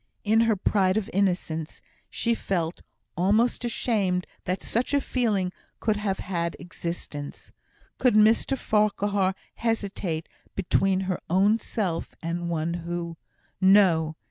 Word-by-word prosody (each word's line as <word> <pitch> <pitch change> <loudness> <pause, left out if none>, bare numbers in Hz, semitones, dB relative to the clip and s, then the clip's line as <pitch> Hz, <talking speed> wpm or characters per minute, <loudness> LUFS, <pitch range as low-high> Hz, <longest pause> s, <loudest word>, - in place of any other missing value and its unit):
In 220 +2 +3
her 225 -2 +3
pride 195 0 +2
of 220 - -2
innocence, 175 -5 -1 0.3
she 235 - 0
felt 175 -6 -2 0.3
almost 215 +8 +2
ashamed 205 -6 0 0.2
that 185 +1 -2
such 250 +5 0
a - - +4
feeling 215 -9 0 0.3
could 215 -2 +1
have 200 -2 -1
had 170 -2 -2
existence. 170 -4 -6 0.5
Could 250 -4 +4
Mr 220 +5 +4
Farquhar 205 -3 +1 0.2
hesitate 200 -8 -2 0.3
between 190 0 +2
her 185 -1 -2
own 200 +5 +4
self 190 -6 -3
and 170 +1 -3
one 165 0 -1
who 170 0 -4 0.5
No! 185 -5 +5
190 Hz, 120 wpm, -26 LUFS, 175-215 Hz, 0.5 s, No